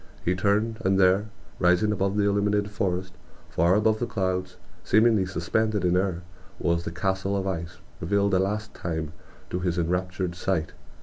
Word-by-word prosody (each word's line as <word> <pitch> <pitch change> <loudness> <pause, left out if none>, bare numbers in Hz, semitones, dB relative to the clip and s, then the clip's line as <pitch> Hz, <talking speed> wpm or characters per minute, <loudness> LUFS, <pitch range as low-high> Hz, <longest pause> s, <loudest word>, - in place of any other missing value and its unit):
He 90 - +2
turned, 105 +4 +1
and 95 0 +2
there, 95 +3 +4 0.3
rising 90 +4 +3
above 100 0 0
the 105 - +3
illuminated 100 0 +1
forest, 95 -3 -2 0.4
far 85 +4 +3
above 110 +1 +2
the 120 - -1
clouds, 95 -2 -2 0.3
seemingly 110 -3 +4
suspended 100 +3 0
in 90 - +3
the 90 - +4
air, 90 -3 -2 0.4
was 85 0 0
the - - -3
castle 95 +3 -1
of 95 - -2
ice, 85 -3 -4 0.2
revealed 100 +4 +1
a 95 - +4
last 105 +3 -2
time 80 -2 -4 0.4
to 90 - -1
his 90 -1 -1
enraptured 90 +1 -1
sight. 85 -2 -1
95 Hz, 170 wpm, -26 LUFS, 90-100 Hz, 0.4 s, there